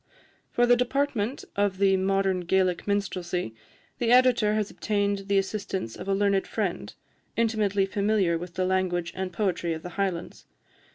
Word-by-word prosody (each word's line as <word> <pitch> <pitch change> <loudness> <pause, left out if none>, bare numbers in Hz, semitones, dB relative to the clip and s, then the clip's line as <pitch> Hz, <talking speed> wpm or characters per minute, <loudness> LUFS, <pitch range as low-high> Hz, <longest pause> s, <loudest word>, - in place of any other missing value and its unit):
For 240 - +2
the 245 0 +5
department 250 -1 -1
of 200 -2 +1
the 195 0 +4
"Modern 190 0 +1
Gaelic 180 +1 +1
Minstrelsy," 180 - -2 0.5
the 235 -1 +1
Editor 245 -4 +5
has 215 -2 -1
obtained 200 -2 -1
the 200 -1 +2
assistance 195 - -2
of - - -8
a 195 - +2
learned 200 -1 +1
friend, - - -3 0.5
intimately 215 -4 +2
familiar 200 -3 +1
with 175 +1 -6
the 185 - 0
language 185 -2 0
and 190 -1 -3
poetry 175 -3 -1
of 160 - -9
the 180 - -6
Highlands. 185 -4 -3
195 Hz, 155 wpm, -26 LUFS, 185-210 Hz, 0.5 s, the